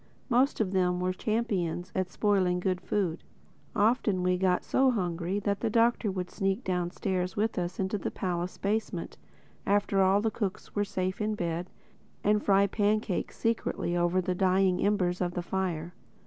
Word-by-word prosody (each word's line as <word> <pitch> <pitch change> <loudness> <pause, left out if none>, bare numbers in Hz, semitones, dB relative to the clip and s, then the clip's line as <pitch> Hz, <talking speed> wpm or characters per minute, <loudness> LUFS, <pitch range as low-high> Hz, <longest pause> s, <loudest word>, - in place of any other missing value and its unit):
Most 255 +3 +3
of 205 -4 +1
them 180 -2 +1
were 185 0 0
champions 185 -5 -1
at 185 -1 -1
spoiling 190 -4 +1
good 185 0 -1
food. 185 -6 -1 0.5
Often 210 -3 +2
we 180 0 +3
got 180 0 +1
so 265 0 +3
hungry 180 -4 -1
that 200 0 -1
the 230 - 0
Doctor 230 -1 +2
would 185 -2 -4
sneak 195 +3 -1
downstairs 180 0 -1
with 220 -1 0
us 175 0 -4
into 195 +2 -1
the - - -2
palace 180 -1 -3
basement, 215 +3 -2 0.5
after 200 -1 +2
all 190 +1 +4
the 220 +1 0
cooks 205 -3 -4
were 205 - +1
safe 185 -1 -2
in 215 0 0
bed, 175 -1 -3 0.5
and 210 0 +3
fry 200 0 +4
pancakes 205 0 0
secretly 225 -6 -1
over 175 +1 +2
the 185 0 -1
dying 185 0 +2
embers 185 -3 +1
of 175 -1 -1
the 175 - -2
fire. 175 -3 -2
190 Hz, 165 wpm, -29 LUFS, 180-210 Hz, 0.5 s, all